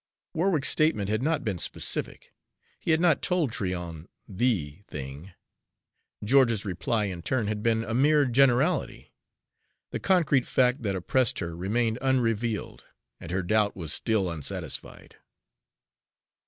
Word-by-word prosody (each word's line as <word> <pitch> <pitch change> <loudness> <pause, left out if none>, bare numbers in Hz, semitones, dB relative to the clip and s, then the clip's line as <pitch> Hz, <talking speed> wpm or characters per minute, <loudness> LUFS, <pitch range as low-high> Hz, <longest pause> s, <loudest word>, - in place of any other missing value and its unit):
Warwick's 165 -4 +1
statement 130 -11 +1
had 110 +2 0
not 155 +1 0
been 100 -5 -2
specific, - - -4 0.5
he - - -6
had 160 0 +4
not 170 -4 +3
told 175 -8 0
Tryon 90 -6 -4 0.2
THE 95 - -1
thing. 75 +6 -8 0.9
George's 115 -2 +3
reply, 100 +4 -1
in 90 -4 -4
turn, 120 +5 -1
had 105 0 -2
been 115 0 +1
a 115 - -4
mere 145 +4 +4
generality. 135 +5 +2 0.8
The - - -3
concrete 160 -9 +2
fact 125 +1 +2
that 100 -4 -1
oppressed 120 +7 +1
her 85 -2 -4
remained 110 +6 -1
unrevealed, 115 -4 -1 0.3
and 85 - -9
her 95 +1 -1
doubt 105 +2 +2
was 85 -5 -4
still 110 -5 0
unsatisfied. 80 -4 -6
110 Hz, 130 wpm, -27 LUFS, 95-130 Hz, 0.9 s, had